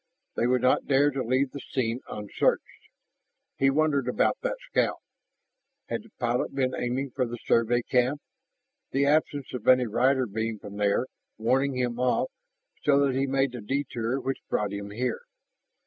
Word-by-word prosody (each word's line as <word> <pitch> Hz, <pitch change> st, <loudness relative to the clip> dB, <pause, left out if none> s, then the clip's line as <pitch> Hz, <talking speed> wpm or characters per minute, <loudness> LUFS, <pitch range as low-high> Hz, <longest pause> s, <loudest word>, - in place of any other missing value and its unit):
They 120 Hz, -, +1 dB
would 125 Hz, 0 st, +2 dB
not 130 Hz, -, +3 dB
dare 145 Hz, +1 st, +4 dB
to 135 Hz, -1 st, -2 dB
leave 130 Hz, +3 st, +1 dB
the 140 Hz, -, -7 dB
scene 120 Hz, -3 st, -2 dB
unsearched. 105 Hz, -1 st, -1 dB, 0.7 s
He 135 Hz, -, +4 dB
wondered 140 Hz, -2 st, +2 dB
about 125 Hz, -, +2 dB
that -, -, -2 dB
scout. -, -, +2 dB, 0.9 s
Had -, -, -2 dB
the 225 Hz, -, -18 dB
pilot 120 Hz, +1 st, -1 dB
been 130 Hz, -2 st, +1 dB
aiming 130 Hz, +2 st, -2 dB
for 125 Hz, -, -1 dB
the 120 Hz, +1 st, -5 dB
Survey 115 Hz, +1 st, +2 dB
camp, 130 Hz, +4 st, +1 dB, 0.7 s
the 140 Hz, +1 st, +1 dB
absence 145 Hz, -2 st, +1 dB
of 125 Hz, -4 st, -6 dB
any 130 Hz, -1 st, +6 dB
rider 130 Hz, +4 st, +2 dB
beam 110 Hz, +1 st, -3 dB
from 100 Hz, 0 st, -10 dB
there 105 Hz, +4 st, +2 dB, 0.3 s
warning 130 Hz, +4 st, +1 dB
him 120 Hz, -1 st, -1 dB
off 125 Hz, -, +1 dB, 0.5 s
so 140 Hz, -1 st, +4 dB
that 135 Hz, -, +1 dB
he 135 Hz, +1 st, +1 dB
made 135 Hz, 0 st, +1 dB
the 120 Hz, -2 st, -7 dB
detour 130 Hz, 0 st, -2 dB
which 135 Hz, 0 st, -3 dB
brought 105 Hz, -1 st, 0 dB
him 100 Hz, 0 st, -5 dB
here? 120 Hz, +3 st, -2 dB
130 Hz, 165 wpm, -27 LUFS, 115-135 Hz, 0.9 s, any